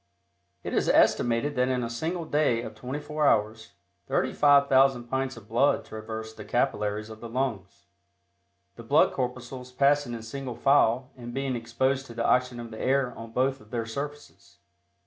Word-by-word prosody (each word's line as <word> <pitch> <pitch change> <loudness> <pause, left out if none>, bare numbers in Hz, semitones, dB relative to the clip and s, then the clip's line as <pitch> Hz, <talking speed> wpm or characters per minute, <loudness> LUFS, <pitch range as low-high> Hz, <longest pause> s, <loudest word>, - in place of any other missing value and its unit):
It - - -5
is - - +1
estimated 120 +5 +3
that 125 0 +2
in 125 -1 0
a - - -2
single 165 +8 -3
day 145 -7 +1
of - - -7
twenty 130 +4 -5
four 150 0 -1
hours, 110 0 0 0.3
35,000 135 -3 +4
pints 130 +1 -3
of 110 -3 -13
blood 120 +6 +2
traverse 110 0 -7
the 110 - -10
capillaries 105 -2 -1
of 110 - -10
the 115 - -8
lungs, 110 -8 -3 0.9
the - - -9
blood - - +4
corpuscles 125 0 -5
passing 140 -1 +2
in 115 - -8
single 125 +1 -6
file 130 0 +3
and 120 -2 -9
being 135 -1 -1
exposed 130 +4 -1
to 115 - -11
the 115 - -1
oxygen 125 -1 +2
of 115 -1 -8
the 110 - -7
air 130 -1 +1
on 115 0 -9
both 130 +3 0
of 105 - -18
their 115 -1 -3
surfaces. 140 -7 -8
125 Hz, 170 wpm, -27 LUFS, 115-135 Hz, 0.9 s, 35,000